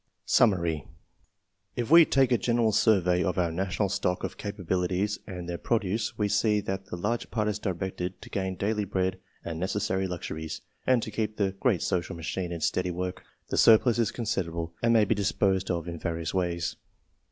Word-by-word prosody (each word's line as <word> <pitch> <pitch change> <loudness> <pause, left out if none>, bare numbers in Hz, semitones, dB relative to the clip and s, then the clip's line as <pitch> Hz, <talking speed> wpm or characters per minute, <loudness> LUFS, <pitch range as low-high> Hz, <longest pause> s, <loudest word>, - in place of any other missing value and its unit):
SUMMARY. 85 - +2 0.9
If 120 +3 -3
we 165 0 +9
take 135 -3 +3
a 120 - +5
general 115 -2 +2
survey 95 -5 +3
of 90 - -1
our 85 -2 +1
national 95 +4 -1
stock 95 -2 -1
of - - -3
capabilities 95 0 -1
and 90 -3 -6
their 85 -1 -4
produce, 110 -1 -1
we 105 - +1
see 105 +1 +2
that 95 -1 -4
the - - -5
larger 105 +7 -2
part 105 -2 -1
is 105 -1 -1
directed 95 -2 -3
to - - -11
gain 95 -1 -2
daily 105 +2 0
bread 95 -1 -1 0.3
and 80 -1 -4
necessary 95 0 -1
luxuries, 80 -3 -5 0.3
and 125 -3 +4
to 110 - -5
keep 110 0 -2
the 100 -2 +1
great 110 -8 +2
social 85 -2 -1
machine 85 +2 -4
in 85 -2 -5
steady 90 +2 0
work. 90 +1 -4 0.3
The - - 0
sur 110 - +8
plus 120 0 0
is 115 -4 +2
considerable, 85 -8 -3
and 115 - +3
may 110 -2 +5
be 105 - +2
disposed 95 -2 +1
of 85 -2 -2
in 85 -1 -5
various 80 -1 -3
ways. 85 -3 -1
95 Hz, 185 wpm, -28 LUFS, 90-105 Hz, 0.9 s, we